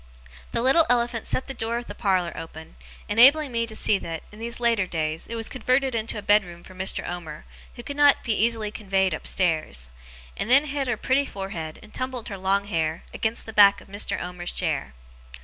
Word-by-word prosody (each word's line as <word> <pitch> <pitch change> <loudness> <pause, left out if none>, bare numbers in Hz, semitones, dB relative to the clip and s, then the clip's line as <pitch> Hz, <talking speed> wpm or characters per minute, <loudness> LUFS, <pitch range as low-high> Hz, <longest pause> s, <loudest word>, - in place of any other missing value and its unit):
The 230 - -1
little 310 +6 +5
elephant 240 -1 +1
set 260 - 0
the 270 - -6
door 235 -1 -2
of 240 - -5
the - - -8
parlour 185 -5 0
open, 160 - -9 0.3
enabling 275 +6 +6
me 230 -1 0
to 220 - -7
see 210 -2 +2
that, 165 -1 -6
in 210 - -13
these 235 +1 -4
latter 230 -5 +2
days, 160 -2 -2
it 230 - -5
was 225 -1 -3
converted 260 +1 0
into 225 -1 -1
a 210 - -6
bedroom 180 -5 +2
for 185 - -13
Mr. 185 +1 -1
Omer 165 -4 -7 0.3
who 240 - -9
could 285 +3 -6
not 290 -1 +5
be 230 - 0
easily 220 -1 0
conveyed 190 -3 0
upstairs; 155 - -1 0.4
and - - -4
then 275 +4 +6
hid 280 -2 -2
her 240 -3 0
pretty 270 +4 +1
forehead, 185 -5 -6
and - - -16
tumbled 255 -2 -4
her 200 - -5
long 195 +1 +1
hair, 160 -4 -2
against 220 +1 -2
the 220 - -8
back 200 -1 +7
of - - -17
Mr. 200 +1 -2
Omer's 180 0 -5
chair. 145 - -2
210 Hz, 205 wpm, -25 LUFS, 180-240 Hz, 0.4 s, back